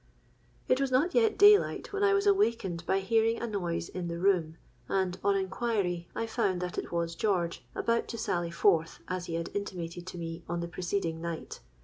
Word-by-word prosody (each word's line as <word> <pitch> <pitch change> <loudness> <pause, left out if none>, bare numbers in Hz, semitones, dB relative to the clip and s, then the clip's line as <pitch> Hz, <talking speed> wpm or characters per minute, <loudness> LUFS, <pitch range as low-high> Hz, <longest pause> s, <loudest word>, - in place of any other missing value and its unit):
"It 255 +2 +3
was 275 - +1
not 280 +8 +2
yet 450 -3 +3
day 410 0 +9
light - - -6
when 405 0 0
I 400 0 +5
was 400 +1 +1
awakened 230 - +2
by 195 - +2
hearing 225 +3 +2
a - - -2
noise 175 -6 -2
in 180 -2 -5
the 170 0 -4
room; 170 -4 +1 0.3
and 190 -2 0
on 200 0 +3
inquiry, 190 -3 -1
I 230 - -1
found 215 -5 0
that 180 0 -3
it - - -6
was 170 -1 -1
George, 170 - -1
about 230 0 0
to 230 - -5
sally 175 -6 -1
forth, 170 -1 +2
as 185 -1 -3
he 165 - -3
had 165 0 -3
intimated 175 -3 -5
to 185 - -7
me 165 0 -6
on 175 0 -1
the 170 - -3
preceding 170 -2 -2
night. 170 -1 -5
185 Hz, 205 wpm, -30 LUFS, 170-230 Hz, 0.3 s, day